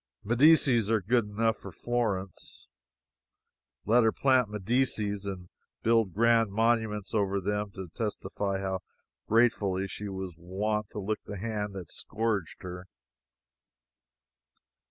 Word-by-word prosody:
Medicis 120 -2 +5
are 115 -1 +3
good 115 +4 +2
enough 110 +1 0
for 100 - -9
Florence. 100 -4 -3 1.2
Let 120 +4 +5
her 110 - +4
plant 130 -4 +3
Medicis 105 -1 0
and 90 -2 -6 0.3
build 115 -3 +3
grand 115 +1 +3
monuments 110 -2 +1
over 100 -2 +1
them 105 +2 -1
to 95 -2 -6
testify 100 -3 -2
how 95 -1 -2 0.5
gratefully 100 -4 +2
she 105 +1 -6
was 95 -2 -5
wont 105 +4 -2
to - - -6
lick 105 +2 -2
the 100 -1 -6
hand 105 -1 -3
that 90 -4 -7
scourged 105 -6 -2
her. 90 0 -7
105 Hz, 120 wpm, -29 LUFS, 95-115 Hz, 1.2 s, Medicis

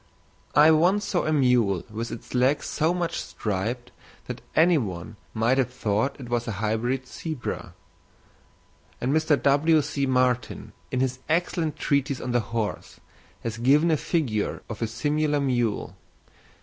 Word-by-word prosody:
I 150 +2 +8
once 180 +6 +3
saw 185 -3 0
a - - +1
mule 125 - +3
with 115 +2 -4
its 115 - -8
legs 130 +3 +2
so 160 +2 +1
much 175 -1 -2
striped 115 +4 -3 0.3
that - - -6
any 165 0 +5
one 95 -2 -5 0.2
might 115 +4 +2
have 125 -1 +1
thought 110 +2 0
that 135 - -10
it 120 - -9
was 120 0 -1
a 115 - -2
hybrid 110 +6 -1
zebra; 155 0 -5 1.2
and 130 +3 0
Mr. 155 -2 +3
W.C. 145 0 +2
Martin, 125 -1 0 0.2
in 130 - -1
his 130 -1 -1
excellent 165 -1 0
treatise 140 -1 0
on 125 - -4
the 120 - +3
horse, 110 -1 -4 0.4
has 115 -1 -4
given 145 +7 +4
a - - +4
figure 135 - -1
of 110 -1 -7
a 115 - +1
similar 145 +6 0
mule. 120 -6 -1
130 Hz, 150 wpm, -25 LUFS, 115-150 Hz, 1.2 s, I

